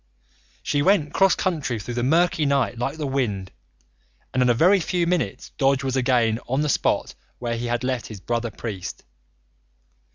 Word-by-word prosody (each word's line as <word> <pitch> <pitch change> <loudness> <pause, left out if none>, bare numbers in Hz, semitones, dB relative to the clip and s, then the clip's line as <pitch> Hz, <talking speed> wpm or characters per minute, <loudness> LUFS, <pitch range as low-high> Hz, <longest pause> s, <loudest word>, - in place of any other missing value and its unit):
She 145 - 0
went 155 -3 +2
cross 195 -1 +4
country 145 -10 -1
through 120 +4 -6
the 120 - -1
murky 165 +5 +2
night 140 -4 +1
like 135 +5 -2
the 155 - -3
wind, 110 -9 -2 0.8
and 130 - +1
in 125 - +4
a - - +5
very 185 +10 +5
few 175 0 0
minutes 170 - -2
Dodge 135 0 +3
was 135 -1 -1
again 120 -4 +2
on 135 +3 +1
the 150 - 0
spot - - 0 0.2
where 120 -1 -3
he 120 +1 -3
had 120 +1 -1
left 125 -2 -2
his 110 -3 -9
brother 115 +3 -2
priest. 105 -5 -6
130 Hz, 175 wpm, -23 LUFS, 120-150 Hz, 0.8 s, a